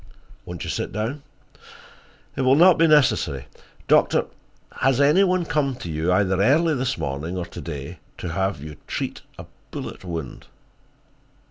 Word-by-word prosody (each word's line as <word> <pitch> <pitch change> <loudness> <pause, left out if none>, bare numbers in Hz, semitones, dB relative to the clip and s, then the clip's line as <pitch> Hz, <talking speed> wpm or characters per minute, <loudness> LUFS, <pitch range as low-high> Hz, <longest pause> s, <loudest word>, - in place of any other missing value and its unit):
"Won't 90 -1 -7
you - - -5
sit - - -3
down?" 115 +8 -3 1.1
"It - - -2
will 130 +1 +4
not 175 +3 +6
be 165 - +5
necessary. 85 - +3 0.4
Doctor, - - +3 0.5
has 135 -1 +2
any 150 +7 +5
one 185 -2 +1
come 140 -4 0
to 85 -9 -7
you, 80 +3 0
either 95 0 +2
early 155 +9 +3
this 130 -1 -1
morning 75 +7 -4
or 90 - -3
to 85 - -9
day, 70 -4 -7 0.2
to 90 - -5
have 95 -3 -2
you 75 -2 -9
treat - - -4 0.2
a - - -9 0.2
bullet - - -7
wound?" 80 -7 -6
105 Hz, 155 wpm, -23 LUFS, -, 1.1 s, not